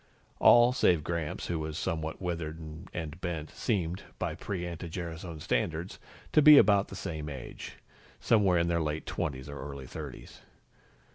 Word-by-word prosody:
All 120 Hz, +1 st, +7 dB
save 85 Hz, -, +3 dB
Gramps, 85 Hz, -2 st, -3 dB
who 85 Hz, -2 st, -2 dB
was 80 Hz, 0 st, -4 dB
somewhat 80 Hz, -1 st, -3 dB
withered 85 Hz, -3 st, -3 dB, 0.3 s
and 80 Hz, 0 st, -6 dB
bent, 80 Hz, -4 st, -4 dB
seemed, 95 Hz, -5 st, -1 dB, 0.2 s
by 90 Hz, -3 st, -2 dB
pre 90 Hz, +1 st, -4 dB
anti 85 Hz, 0 st, -6 dB
gerasone 85 Hz, -1 st, -6 dB
standards, 85 Hz, +3 st, -2 dB, 0.3 s
to 155 Hz, -, +5 dB
be 150 Hz, 0 st, +10 dB
about 100 Hz, -3 st, +5 dB
the -, -, -9 dB
same 80 Hz, -5 st, -5 dB
age 65 Hz, -3 st, -8 dB, 0.5 s
somewhere 95 Hz, -, +3 dB
in 85 Hz, 0 st, +2 dB
their 85 Hz, -1 st, +1 dB
late 75 Hz, 0 st, -2 dB
twenties 70 Hz, -5 st, -3 dB
or 70 Hz, 0 st, -7 dB
early 70 Hz, -1 st, -7 dB
thirties. -, -, -9 dB
85 Hz, 155 wpm, -30 LUFS, 80-90 Hz, 0.5 s, be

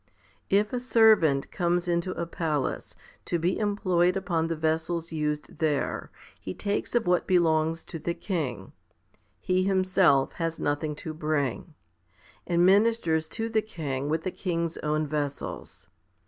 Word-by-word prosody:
If 205 Hz, +3 st, +2 dB
a 250 Hz, -, 0 dB
servant 220 Hz, -, +4 dB
comes 175 Hz, 0 st, 0 dB
into 170 Hz, +1 st, 0 dB
a 170 Hz, -, -3 dB
palace, 155 Hz, -5 st, -2 dB, 0.3 s
to 175 Hz, -, 0 dB
be 170 Hz, +3 st, 0 dB
employed 185 Hz, -4 st, +2 dB
upon 170 Hz, -4 st, -1 dB
the 165 Hz, -, -2 dB
vessels 160 Hz, +1 st, -1 dB
used 150 Hz, -1 st, -3 dB
there, 150 Hz, -3 st, -1 dB, 0.3 s
he 95 Hz, -, -6 dB
takes 205 Hz, +3 st, -2 dB
of 235 Hz, -2 st, +2 dB
what 180 Hz, 0 st, +2 dB
belongs 165 Hz, -3 st, +2 dB
to 165 Hz, -, -7 dB
the 170 Hz, +2 st, -2 dB
king 135 Hz, -, -3 dB, 0.7 s
he 185 Hz, 0 st, +1 dB
himself 185 Hz, -7 st, +3 dB
has 165 Hz, 0 st, -1 dB
nothing 145 Hz, +1 st, -1 dB
to 160 Hz, -, -4 dB
bring 155 Hz, 0 st, -2 dB, 0.7 s
and 175 Hz, 0 st, +3 dB
ministers 190 Hz, -6 st, +3 dB
to 225 Hz, 0 st, -1 dB
the 220 Hz, -1 st, +1 dB
king 145 Hz, -9 st, -4 dB
with 160 Hz, +1 st, 0 dB
the 185 Hz, -, -2 dB
king's 170 Hz, -3 st, -2 dB
own 155 Hz, +1 st, 0 dB
vessels. 145 Hz, -1 st, -5 dB
165 Hz, 145 wpm, -27 LUFS, 155-185 Hz, 0.7 s, servant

